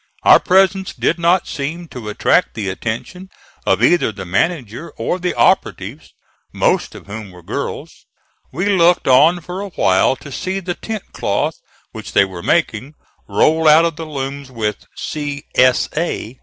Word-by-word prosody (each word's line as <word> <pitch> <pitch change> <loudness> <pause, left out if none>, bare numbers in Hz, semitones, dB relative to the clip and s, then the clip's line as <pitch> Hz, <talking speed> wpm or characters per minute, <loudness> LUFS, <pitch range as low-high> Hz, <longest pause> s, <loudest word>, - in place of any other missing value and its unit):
Our - - +8
presence 190 0 +2
did - - 0
not 170 +2 +2
seem 165 +5 -5
to 115 -4 -7
attract 105 - +1
the 105 -4 -3
attention 120 - -5 0.4
of 95 +4 +2
either 170 -3 +3
the 100 -2 -8
manager 125 - -2
or 180 - -2
the 180 0 -2
operatives, 135 - 0 0.4
most - - 0
of - - -11
whom 105 0 -8
were 90 -1 -15
girls. - - -6 0.4
We 175 +8 -2
looked 180 -3 +3
on 150 +7 +5
for 180 +3 -6
a 200 - -5
while 95 - +2
to 140 - -12
see 190 +7 -3
the 180 -1 -3
tent 220 +2 -6
cloth - - -1 0.4
which - - -9
they 100 - +5
were 95 -3 -8
making 140 - 0 0.3
roll 160 +1 +3
out 155 +2 +7
of 165 -2 -1
the 160 0 -7
looms, 140 -1 -5
with 110 -4 -4
"C. 145 -2 -5
S. 130 0 +4
A." 140 -7 -3
150 Hz, 165 wpm, -18 LUFS, 110-175 Hz, 0.4 s, Our